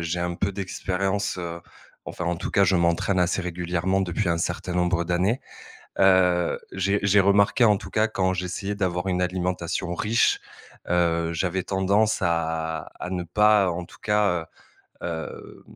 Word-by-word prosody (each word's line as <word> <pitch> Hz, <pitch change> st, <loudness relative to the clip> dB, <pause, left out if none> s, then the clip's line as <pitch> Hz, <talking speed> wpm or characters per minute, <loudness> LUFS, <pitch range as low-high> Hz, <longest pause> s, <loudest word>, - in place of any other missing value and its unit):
j'ai 85 Hz, +1 st, -2 dB
un 85 Hz, 0 st, -2 dB
peu 100 Hz, +3 st, -1 dB
d'expérience, 95 Hz, 0 st, -2 dB
heu, 85 Hz, -1 st, -5 dB, 0.5 s
enfin 90 Hz, -, -5 dB
en 85 Hz, -, +1 dB
tout -, -, -5 dB
cas 100 Hz, -, +4 dB
je 95 Hz, 0 st, +2 dB
m'entraîne 85 Hz, +2 st, +2 dB
assez 90 Hz, +2 st, +1 dB
régulièrement, 90 Hz, +2 st, -1 dB
depuis 95 Hz, +1 st, -1 dB
un 85 Hz, -, +2 dB
certain 90 Hz, +1 st, -3 dB
nombre 90 Hz, -1 st, +1 dB
d'années, 90 Hz, +8 st, 0 dB, 0.6 s
heu. 90 Hz, -2 st, +3 dB
J'ai 100 Hz, +2 st, +1 dB
j'ai 100 Hz, 0 st, +5 dB
remarqué 100 Hz, +4 st, +3 dB
en 105 Hz, -3 st, +5 dB
tout -, -, -10 dB
cas 110 Hz, +1 st, +1 dB
quand 95 Hz, -3 st, 0 dB
j'essayais 90 Hz, +3 st, -3 dB
d'avoir 90 Hz, -2 st, -1 dB
une 90 Hz, -1 st, 0 dB
alimentation 90 Hz, -1 st, -2 dB
riche, 105 Hz, +4 st, +2 dB, 0.5 s
heu, 85 Hz, -1 st, +1 dB
j'avais 90 Hz, +2 st, -1 dB
tendance 100 Hz, +4 st, +1 dB
à 80 Hz, -2 st, -1 dB
à 90 Hz, -, -5 dB
ne 90 Hz, -1 st, -2 dB
pas, 105 Hz, +1 st, +3 dB
en 85 Hz, +1 st, -4 dB
tout -, -, -17 dB
cas, 105 Hz, -5 st, +1 dB, 0.6 s
heu, -, -, -2 dB
hem, 80 Hz, -2 st, -6 dB
90 Hz, 165 wpm, -25 LUFS, 85-100 Hz, 0.6 s, j'ai